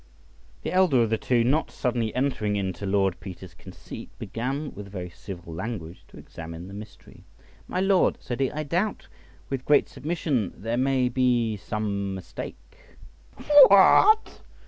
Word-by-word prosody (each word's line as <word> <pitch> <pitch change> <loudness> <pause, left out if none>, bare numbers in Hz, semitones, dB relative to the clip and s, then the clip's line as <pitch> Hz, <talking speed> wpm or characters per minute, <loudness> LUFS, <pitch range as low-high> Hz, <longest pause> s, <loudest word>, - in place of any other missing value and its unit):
The - - -3
elder 180 -10 +4
of 115 - -2
the 110 - +1
two, 120 0 +2
not 145 +6 +1
suddenly 120 -4 -1
entering 125 -6 0
into 100 0 -3
Lord 95 -2 +1
Peter's 90 -2 -10
conceit, 90 +1 -11
began 135 +6 -4
with 100 0 -9
very 90 -3 -6
civil 85 -3 -9
language 90 -2 -6
to - - -16
examine 80 +2 -9
the 95 - -10
mystery. 105 +1 -12 0.4
"My 180 - -2
lord," 195 -1 +3
said 120 0 -5
he, 135 -1 +2
"I 155 +1 -4
doubt, 175 +8 -2 0.4
with 135 -2 -2
great 145 +1 +4
submission, 145 - -2
there 115 +4 -3
may 130 0 +2
be 120 -3 +1
some 100 -1 -3
mistake." 90 -1 -7 1.1
"What!" 410 - +5
115 Hz, 145 wpm, -25 LUFS, 95-135 Hz, 1.1 s, What